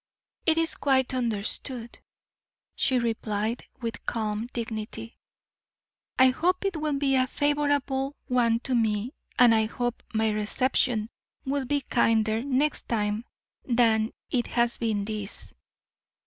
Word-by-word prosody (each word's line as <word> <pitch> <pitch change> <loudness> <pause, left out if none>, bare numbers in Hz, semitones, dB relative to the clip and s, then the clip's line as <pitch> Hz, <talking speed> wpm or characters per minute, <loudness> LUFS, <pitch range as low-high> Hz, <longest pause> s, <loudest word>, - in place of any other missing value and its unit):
"It 320 0 +4
is 330 0 +3
quite 260 -2 +1
understood," 235 +1 -2 0.8
she 260 - +2
replied, 225 -1 -1 0.2
with 230 -3 -4
calm 215 0 -2
dignity. 225 0 -5 1.0
"I 260 0 +7
hope 360 +9 +1
it 390 -3 0
will 305 -2 -1
be 275 -1 +1
a 255 -1 +3
favorable 285 -1 0
one 235 -3 +2
to 260 - -2
me, 225 +1 +1 0.2
and 245 -2 +7
I 220 -1 +3
hope 240 +2 -3
my 220 0 +1
reception 215 +1 0 0.3
will 275 0 -1
be 285 +2 0
kinder 225 -3 +2
next 280 +2 0
time 210 0 0 0.4
than 230 -3 +3 0.2
it 245 -2 +1
has 235 0 +1
been 215 -4 0
this." 210 -1 -5
240 Hz, 125 wpm, -27 LUFS, 220-265 Hz, 1.0 s, I